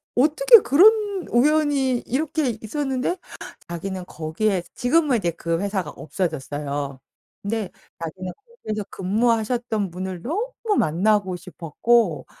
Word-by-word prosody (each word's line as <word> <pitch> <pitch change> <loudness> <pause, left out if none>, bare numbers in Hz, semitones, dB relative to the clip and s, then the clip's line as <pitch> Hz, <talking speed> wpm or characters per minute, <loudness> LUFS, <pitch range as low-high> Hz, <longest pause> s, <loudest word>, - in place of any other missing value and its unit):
어떻게 405 - +7
그런 400 +4 +4
우연이 275 -1 +2
이렇게 285 -3 -1
있었는데 265 - -2 0.5
자기는 185 +2 -5
거기에 175 +4 -1
지금은 280 0 +2
이제 175 -6 -1
그 165 +1 -2
회사가 195 -5 -2
없어졌어요. 145 -5 -4 0.4
근데 210 -2 -2 0.3
자기는 180 +3 -5 0.3
거기에서 215 -1 -2
근무하셨던 220 +1 0
분을 185 0 -5
너무 425 - -2 0.2
만나고 190 +4 +2
싶었고 180 +3 0
215 Hz, 285 characters per minute, -23 LUFS, 180-275 Hz, 0.5 s, 어떻게